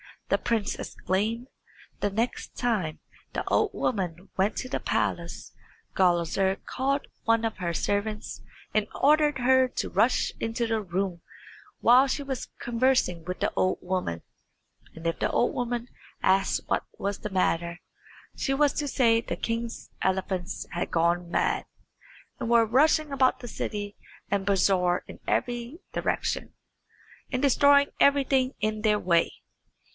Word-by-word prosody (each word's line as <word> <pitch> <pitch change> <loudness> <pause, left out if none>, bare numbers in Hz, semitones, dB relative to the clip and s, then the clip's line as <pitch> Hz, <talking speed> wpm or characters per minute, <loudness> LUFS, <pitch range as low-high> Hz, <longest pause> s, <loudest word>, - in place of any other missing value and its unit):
the - - +3
prince 225 -3 -1
exclaimed. 220 +6 -2 0.5
The 205 - +1
next 225 +5 -2
time 205 -11 -1 0.3
the - - -2
old - - +2
woman 185 -4 -2
went 195 +3 +1
to 255 - -5
the - - -1
palace - - -2 0.4
Gulizar 185 +1 +2
called 275 +2 -1 0.2
one 230 0 +3
of 225 - -2
her 170 -2 -2
servants 210 +4 -2 0.3
and 210 -1 +2
ordered 295 -1 +3
her 260 +1 +4
to 250 - -3
rush - - +2
into 230 +1 -1
the 225 -1 0
room 185 -2 -2 0.6
while 255 +3 +6
she 285 +2 -2
was 270 -2 -4
conversing 235 -8 +1
with 180 +1 -5
the - - 0
old 185 - +2
woman; 180 - -2 0.7
and 165 +1 -10
if 165 - -1
the - - +1
old 240 - +1
woman 240 -1 -2 0.4
asked 195 +1 +3
what - - 0
was 200 0 -2
the 210 - -5
matter, 170 -2 0 0.6
she 270 - -1
was 290 0 +3
to 295 - -2
say 235 -4 +3
that - - -25
the - - -1
king's 230 0 -4
elephants 190 -1 -1
had 175 - -2
gone 170 +1 +1
mad, - - +1 0.7
and 230 - -3
were 235 -1 +5
rushing 295 +6 +3
about 260 -2 +2
the 245 - -7
city 205 -2 -4 0.3
and 200 -1 0
bazaar 185 -2 +2
in - - -10
every 240 +5 -1
direction, - - -2 0.8
and 255 -1 -1
destroying 280 +1 +5
everything 270 -2 +3
in 215 0 -1
their 210 -1 +3
way. 170 -4 +2
220 Hz, 145 wpm, -27 LUFS, 185-255 Hz, 0.8 s, while